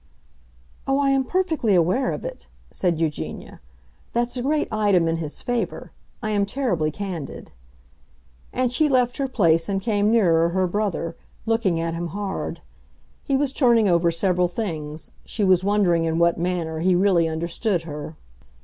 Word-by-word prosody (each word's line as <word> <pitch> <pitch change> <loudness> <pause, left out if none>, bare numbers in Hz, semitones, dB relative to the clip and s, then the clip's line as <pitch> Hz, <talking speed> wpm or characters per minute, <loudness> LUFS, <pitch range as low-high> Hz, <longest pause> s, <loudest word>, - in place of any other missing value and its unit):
"Oh, 270 +1 +2
I 275 -1 +3
am 270 -1 +2
perfectly 320 - +1
aware 180 +10 +2
of - - -5
it," - - -7 0.2
said 175 -4 0
Eugenia. 160 -3 -4 0.5
"That's 240 +1 0
a 250 - -2
great 295 +4 0
item 205 -6 +2
in 165 0 0
his 155 -2 -6
favor. 245 -1 -3 0.3
I 215 - -1
am 205 -1 +2
terribly 205 - 0
candid." 175 -3 -6 1.0
And 250 -1 0
she 300 +4 +3
left 250 -2 +2
her 275 - 0
place 165 -8 +2
and 195 -1 0
came 205 0 +1
nearer 170 -7 +4
her 185 +2 +1
brother, 180 -3 -2 0.3
looking 225 -7 +1
at 165 0 -2
him 170 +1 -3
hard. 195 +3 -4 0.6
He 275 - +1
was 275 -1 0
turning 235 -6 +4
over 170 -1 +3
several 180 +1 +1
things; 160 -6 -5
she 215 - -3
was 185 -2 +4
wondering 190 -5 +2
in 165 0 0
what 170 0 +3
manner 170 -2 -2
he 180 +2 +3
really 180 -3 +3
understood 170 +4 -1
her. 150 0 -7
190 Hz, 160 wpm, -23 LUFS, 165-235 Hz, 1.0 s, nearer